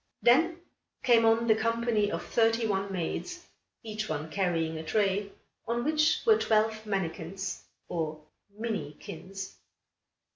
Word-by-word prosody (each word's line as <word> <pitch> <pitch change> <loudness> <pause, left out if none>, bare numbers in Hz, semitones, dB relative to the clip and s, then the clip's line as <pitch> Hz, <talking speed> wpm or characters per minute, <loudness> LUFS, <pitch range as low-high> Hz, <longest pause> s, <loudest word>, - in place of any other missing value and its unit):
Then 325 +8 +4 0.4
came 230 -2 +5
on 225 +1 +4
the 225 - +6
company 230 -1 +1
of - - -3
thirty 225 0 +2
one 195 -2 -1
maids, 345 - -4 0.4
each 215 -1 -4
one 155 +1 -3
carrying 165 -4 0
a - - -5
tray, 200 +2 +1 0.4
on 235 +1 0
which 305 +2 +2
were 440 -2 +6
twelve 220 0 +1
mannikins, 190 -1 -3 0.3
or 160 -3 -3 0.4
minikins. 195 -1 -5
215 Hz, 120 wpm, -29 LUFS, 190-230 Hz, 0.4 s, the